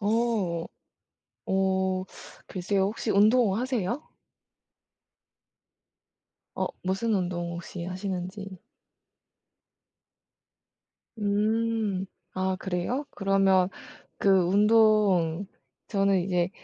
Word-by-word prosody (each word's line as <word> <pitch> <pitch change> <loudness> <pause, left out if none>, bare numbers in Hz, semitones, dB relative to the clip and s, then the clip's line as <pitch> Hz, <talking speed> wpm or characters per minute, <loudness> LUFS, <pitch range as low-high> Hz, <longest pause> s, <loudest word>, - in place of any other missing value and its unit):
오. 210 -6 0 0.8
오. 190 -1 +1 0.4
글쎄요. 190 +1 -1
혹시 215 +2 -2
운동하세요? 225 +3 +2 2.5
어. - - 0 0.2
무슨 195 +5 0
운동 175 -3 -2
혹시 170 0 -7
하시는지? 185 +1 -5 2.6
음. 210 -1 0 0.3
아. 185 0 0
그래요? 190 +10 -2
그러면 195 -2 +3 0.5
그 200 - +2 0.2
운동 205 -3 +4 0.4
저는 195 -2 +2
이제 175 -1 0
195 Hz, 135 characters per minute, -27 LUFS, 185-215 Hz, 2.6 s, 운동